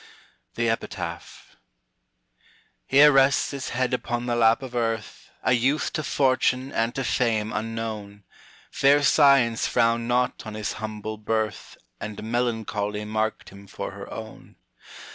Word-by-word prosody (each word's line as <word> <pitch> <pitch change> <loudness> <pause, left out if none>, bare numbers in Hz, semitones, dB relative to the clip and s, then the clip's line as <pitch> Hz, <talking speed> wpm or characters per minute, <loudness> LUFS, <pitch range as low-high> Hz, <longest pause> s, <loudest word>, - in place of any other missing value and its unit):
THE 115 0 0
EPITAPH. 115 0 -5 1.3
Here 145 +2 +7
rests 135 0 +3
his 140 -2 -5
head 130 +1 -1
upon 120 -1 -2
the 120 -1 0
lap 115 +2 +3
of 130 -2 -8
Earth 115 -4 -3
A 130 - +3
youth 135 +5 +1
to - - -1
Fortune 130 -2 +1
and 115 -1 -1
to 135 - -2
Fame 110 -4 0
unknown; 110 -2 -5 0.5
Fair 145 +1 +4
Science 140 -6 +4
frowned 115 0 +1
not 125 +1 0
on 110 -1 -7
his 105 -1 -3
humble 110 0 -5
birth, 110 -1 -3 0.2
And 105 0 -6
Melancholy 110 -3 -2
marked 110 +1 -2
him 100 +1 -14
for - - -6
her - - -10
own. - - -9
115 Hz, 135 wpm, -25 LUFS, 110-130 Hz, 1.3 s, Here